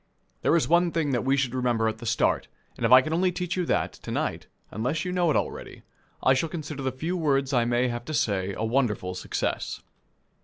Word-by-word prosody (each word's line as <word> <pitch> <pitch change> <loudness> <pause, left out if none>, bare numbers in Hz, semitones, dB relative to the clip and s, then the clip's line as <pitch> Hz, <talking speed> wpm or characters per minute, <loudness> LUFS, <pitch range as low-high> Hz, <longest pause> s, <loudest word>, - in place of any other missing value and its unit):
There - - +3
is 170 - +2
one 175 +1 +3
thing 160 -4 0
that 120 -3 0
we 135 +2 +2
should 130 -3 0
remember 120 -3 +1
at 110 0 -2
the 115 - -7
start, 120 - +1 0.3
and - - 0
if - - -3
I 130 0 +10
can 155 - -3
only 180 +2 +2
teach 180 0 -3
you 180 -2 -1
that, - - 0
to - - -11
night - - -2 0.2
unless 130 +10 -2
you 180 - -2
know 180 -2 +2
it 150 - +2
already - - -5 0.4
I 130 - +5
shall 145 +5 0
consider 150 -3 -5
the 130 -1 -1
few 160 +8 -3
words 140 -5 +1
I 120 -2 +3
may 120 +1 +2
have 120 0 -5
to 155 - -5
say 100 -4 0
a 110 - -1
wonderful 110 -6 0
success. 90 - -3
135 Hz, 230 wpm, -26 LUFS, 120-160 Hz, 0.4 s, I